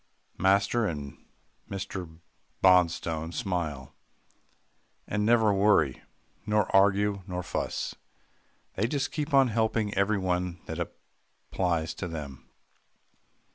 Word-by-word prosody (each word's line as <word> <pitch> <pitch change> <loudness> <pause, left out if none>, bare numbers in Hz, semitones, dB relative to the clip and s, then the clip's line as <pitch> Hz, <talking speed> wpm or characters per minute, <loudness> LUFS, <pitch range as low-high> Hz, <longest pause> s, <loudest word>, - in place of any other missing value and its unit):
Master 100 +4 +3
and 75 -4 -6 0.5
Mr. 95 -4 -6 0.5
Bonstone 85 -3 +3
smile, 80 -7 -3 1.1
and 105 0 -1
never 110 -1 +4
worry, 95 -9 +3 0.4
nor 105 -2 +1
argue, 100 +1 +3
nor 90 -1 -4
fuss 90 - -3 0.8
they 105 +4 0
just 140 +2 -1
keep 150 0 -3
on 135 -2 +5
helping 110 -1 0
everybody 95 -3 0
that - - -5
applies 85 -4 -4
to 90 - -5
them. 70 -6 -8
95 Hz, 95 wpm, -28 LUFS, 85-105 Hz, 1.1 s, on